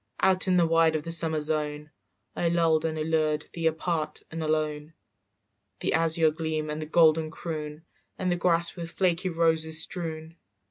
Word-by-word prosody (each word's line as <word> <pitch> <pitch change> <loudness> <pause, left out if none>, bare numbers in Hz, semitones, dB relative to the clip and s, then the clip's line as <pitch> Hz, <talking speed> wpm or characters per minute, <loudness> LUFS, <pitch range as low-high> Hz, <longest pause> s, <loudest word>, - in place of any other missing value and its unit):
"Out 190 0 +3
in 185 - +3
the 175 -1 +4
wide 165 -1 +3
of 155 - -2
the 165 - -6
summer 160 -2 +1
zone 150 0 -2 0.4
I 170 - 0
lulled 165 -2 +2
and 160 -1 -2
allured 155 -1 0
thee 165 -1 -1
apart 160 -1 -2
and 165 0 -5
alone, 155 0 -2 0.9
"The - - 0
azure 160 -1 +3
gleam 155 -1 -3
and 150 +1 -4
the 155 - -5
golden 160 -1 +3
croon 155 -1 -6 0.3
And 185 -1 -1
the - - +2
grass 170 -1 +1
with 170 -2 -6
the - - -15
flaky 185 0 +1
roses 160 -2 +2
strewn. 160 -2 -6
160 Hz, 175 wpm, -27 LUFS, 155-170 Hz, 0.9 s, the